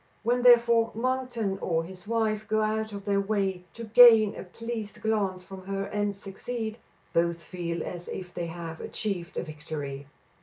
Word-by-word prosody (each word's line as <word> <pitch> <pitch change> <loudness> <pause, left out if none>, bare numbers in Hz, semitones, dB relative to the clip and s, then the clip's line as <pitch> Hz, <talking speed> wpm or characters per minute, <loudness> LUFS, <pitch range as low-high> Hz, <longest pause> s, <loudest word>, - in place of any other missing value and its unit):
When, 245 +2 +2
therefore, 235 -2 +6
Monkton 240 -5 -1
or 165 -3 0
his 185 +3 -11
wife 215 -2 0
go 215 0 +2
out 220 0 -1
of 200 0 -7
their 200 -1 +2
way 195 -3 -1
to 235 - -7
gain 225 -2 +8
a - - -6
pleased 220 +2 -6
glance 200 -4 0
from 190 0 -11
her 195 0 -2
and 205 0 -2
succeed, 220 +3 -5 0.3
both 170 0 +1
feel 170 -2 -4
as 175 -1 -7
if 180 -1 -6
they 170 - -3
had 165 -1 -7
achieved 195 -4 -3
a - - -1
victory. 150 -3 -6
200 Hz, 165 wpm, -28 LUFS, 180-225 Hz, 0.3 s, gain